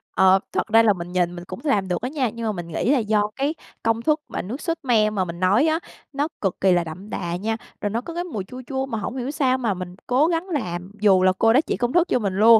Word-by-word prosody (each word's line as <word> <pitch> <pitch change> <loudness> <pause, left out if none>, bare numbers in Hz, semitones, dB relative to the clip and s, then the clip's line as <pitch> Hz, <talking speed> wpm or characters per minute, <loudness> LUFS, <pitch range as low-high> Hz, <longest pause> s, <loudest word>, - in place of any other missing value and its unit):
Ờ, 190 0 +6
thật - - -1
ra 225 - +8
là 215 -2 +5
mình 175 -1 -7
nhìn 175 -1 0
mình 175 - -7
cũng 185 +1 -7
làm 205 -11 +1
được 180 - -1
á 250 - -2
nha. 270 -5 0
Nhưng 230 0 -5
mà 220 - +1
mình 175 -4 -6
nghĩ 170 - 0
là 285 - +4
do 210 -1 +1
cái 285 +4 -1 0.3
công 225 0 +1
thức 305 +5 +2
mà - - -4
nước 240 - -6
sốt 330 -1 -1
me 220 -5 +3
mà 195 -3 -1
mình 170 0 -7
nói 200 - +4
á, 320 +1 +2 0.3
nó 285 +2 0
cực 195 -3 -1
kỳ 190 - +5
là 175 -1 +3
đậm 180 +6 -9
đà 175 -3 -3
nha, 220 +4 -2 0.2
rồi 205 - 0
nó 225 +3 -1
có 335 - -8
cái 345 +1 -2
mùi 225 - -4
chua 255 +7 -9
chua 265 -1 -2
mà 230 -4 -4
hổng 245 +5 -4
hiểu 255 +2 -2
sao 265 -4 +2
mà 230 -6 0
mình 180 -1 -7
cố 265 +5 +3
gắng 340 +2 -1
làm 180 - -3
dù 190 -3 +5
là 185 - +6
cô 225 0 +5
đó 260 - +6
chỉ - - -3
công 240 +1 -1
thức 350 0 +4
cho - - +2
mình 200 -4 -1
luôn, 225 +2 +7
225 Hz, 295 wpm, -23 LUFS, 185-265 Hz, 0.3 s, ra